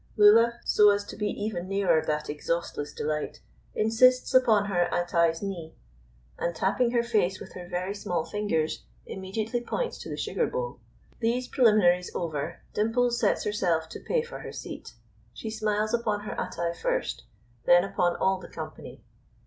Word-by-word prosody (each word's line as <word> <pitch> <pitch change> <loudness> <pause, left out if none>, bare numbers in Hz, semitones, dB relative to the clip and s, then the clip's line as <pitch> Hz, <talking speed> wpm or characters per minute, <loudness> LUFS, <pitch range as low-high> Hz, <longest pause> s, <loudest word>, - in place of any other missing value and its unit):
Lulla, 230 +3 +6
so 210 0 +6
as 205 0 +2
to 205 - -9
be 210 - -1
even 205 -5 -3
nearer 190 -5 +2
that 150 0 -2
exhaustless 150 0 -3
delight, 150 0 -3 0.4
insists 250 +5 +4
upon 225 -5 +5
her 175 -3 +1
Attai's 170 -1 +1
knee; 175 -5 -5 0.6
and 170 0 -1
tapping 235 +8 +1
her 235 0 +1
face 190 -5 +1
with - - -10
her 180 -1 -8
very 185 +2 -2
small 175 -5 -2
fingers, 185 -7 -1 0.2
immediately 215 +5 -3
points 485 - -3
to - - -8
the - - -4
sugar 475 - -1
bowl. - - -4 0.4
These 245 +2 0
preliminaries 200 -7 +4
over, 155 -5 -3
Dimples 240 +3 +1
sets - - +2
herself 175 -6 0
to - - -8
pay 485 -2 0
for 480 - -8
her - - -7
seat. - - -8 0.4
She 220 - -5
smiles 215 0 -1
upon 215 -3 0
her 210 - -5
Attai 170 0 -3
first, - - -2 0.4
then 175 0 +6
upon 175 -3 0
all 190 0 +1
the - - -10
company. - - -9
205 Hz, 160 wpm, -27 LUFS, 175-225 Hz, 0.6 s, Lulla